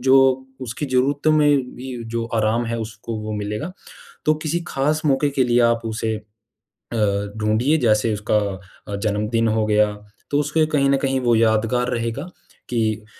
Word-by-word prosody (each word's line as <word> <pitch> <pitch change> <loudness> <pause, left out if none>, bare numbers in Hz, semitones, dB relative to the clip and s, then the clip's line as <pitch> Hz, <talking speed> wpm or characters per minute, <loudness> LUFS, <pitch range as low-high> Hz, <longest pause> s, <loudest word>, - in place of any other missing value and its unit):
जो 130 0 +6 0.5
उसकी 130 +4 -4
ज़रूरतों 135 +4 +2
में 145 -4 +3
भी 130 0 -6 0.2
जो 115 0 0
आराम 110 +2 +1
है, 115 0 -2
उसको 110 0 -6
वो 110 0 -5
मिलेगा। 105 - -4 0.5
तो 155 - +4
किसी 170 +2 -1
ख़ास 150 +3 0
मौके 145 +1 +2
के 135 -2 +1
लिए 120 0 +3
आप 115 0 0
उसे 110 0 -2 0.6
अ, 100 -3 -2
ढूँढिए 110 +8 +2
जैसे 110 0 +3
उसका 105 +1 0 0.6
अ, - - 0
जन्मदिन 105 +3 0
हो 110 0 +1
गया, 105 0 +3 0.4
तो 145 - +3
उसके 150 +2 +2
कहीं 140 -1 +3
न 140 - +4
कहीं 135 -1 +1
वो 120 - +5
यादगार 115 +2 +2
रहेगा 115 +4 -2 0.5
कि 110 -3 -1
115 Hz, 165 wpm, -21 LUFS, 110-135 Hz, 0.6 s, जो